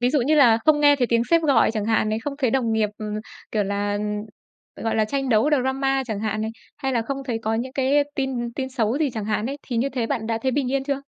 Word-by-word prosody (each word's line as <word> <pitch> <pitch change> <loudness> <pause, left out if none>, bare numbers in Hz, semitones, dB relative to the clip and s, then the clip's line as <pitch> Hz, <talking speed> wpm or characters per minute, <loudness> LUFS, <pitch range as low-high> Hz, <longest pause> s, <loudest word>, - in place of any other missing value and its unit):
ví 245 +1 +2
dụ 290 - +2
như 285 +6 +2
là 245 -7 +6
không 305 -1 +4
nghe 290 -1 +6
thấy 250 -3 +1
tiếng 235 0 +2
sếp 335 -1 +4
gọi 280 -7 +4
chẳng 215 -2 -2
hạn 220 0 +1
này, 215 +1 0
không 280 +5 -4
thấy 260 -5 +1
đồng 235 -3 +1
nghiệp, 220 -1 +2
ừm, 210 -1 -4 0.4
kiểu 215 -2 +1
là, 200 +1 -1
ừm, 205 0 -2 0.8
gọi 225 - 0
là, 220 - +3
tranh 270 +4 -2
đấu 230 +5 +3
drama 270 -1 +1
chẳng 215 -3 -3
hạn 215 0 -2
này, 220 - -2 0.3
hay 270 -2 -2
là 235 -2 +1
không 275 +3 -4
thấy 235 -4 -2
có 220 0 0
những 255 +3 -3
cái 280 +2 +2
tin 255 -3 -2
tin 260 +1 -3
xấu 255 0 0
gì 295 -4 +1
chẳng 220 -3 -4
hạn 210 +1 -1
ấy, 275 +2 -4
thì 245 - -4
như 245 +4 +1
thế 245 -4 -2
bạn 230 -4 -2
đã 225 0 -1
thấy 260 - +1
bình 260 -1 -1
yên 275 -1 0
chưa? 280 -1 -1
250 Hz, 280 wpm, -23 LUFS, 220-275 Hz, 0.8 s, là